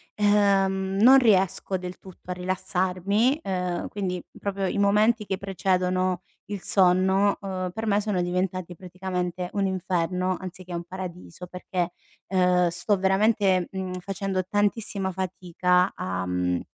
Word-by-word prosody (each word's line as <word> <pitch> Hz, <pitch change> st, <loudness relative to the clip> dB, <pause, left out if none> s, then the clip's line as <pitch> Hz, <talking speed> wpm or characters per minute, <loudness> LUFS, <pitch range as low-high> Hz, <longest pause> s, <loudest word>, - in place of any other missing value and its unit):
Ehm, 195 Hz, -2 st, +2 dB
non 260 Hz, +5 st, +8 dB
riesco 195 Hz, -4 st, +2 dB
del 180 Hz, 0 st, -7 dB
tutto 185 Hz, -1 st, -11 dB
a -, -, 0 dB
rilassarmi, 185 Hz, -, 0 dB
uhm, 180 Hz, -2 st, -2 dB
quindi 185 Hz, -3 st, -3 dB, 0.2 s
proprio 200 Hz, -1 st, -2 dB
i 195 Hz, -, -1 dB
momenti 210 Hz, +2 st, +3 dB
che 190 Hz, -, -1 dB
precedono 185 Hz, -1 st, 0 dB, 0.2 s
il 205 Hz, -1 st, -5 dB
sonno, 190 Hz, +1 st, +3 dB
uhm, 185 Hz, -2 st, -3 dB
per 220 Hz, +4 st, -5 dB
me 205 Hz, -1 st, +2 dB
sono 205 Hz, -3 st, -1 dB
diventati 180 Hz, 0 st, -2 dB
praticamente 180 Hz, 0 st, -4 dB
un 200 Hz, -1 st, +1 dB
inferno 185 Hz, 0 st, -1 dB
anziché 185 Hz, -1 st, -8 dB
un 170 Hz, 0 st, -4 dB
paradiso 180 Hz, -1 st, -8 dB
perché, 180 Hz, -1 st, -3 dB, 0.4 s
uhm, 180 Hz, -1 st, +3 dB
sto 175 Hz, +4 st, 0 dB
veramente, 195 Hz, -1 st, +2 dB
mhmm, 185 Hz, -1 st, -4 dB
facendo 195 Hz, 0 st, -2 dB
tantissima 205 Hz, -2 st, 0 dB
fatica 180 Hz, -1 st, 0 dB
a 95 Hz, 0 st, -3 dB
mhmm, 90 Hz, -1 st, 0 dB
185 Hz, 135 wpm, -25 LUFS, 180-195 Hz, 0.4 s, non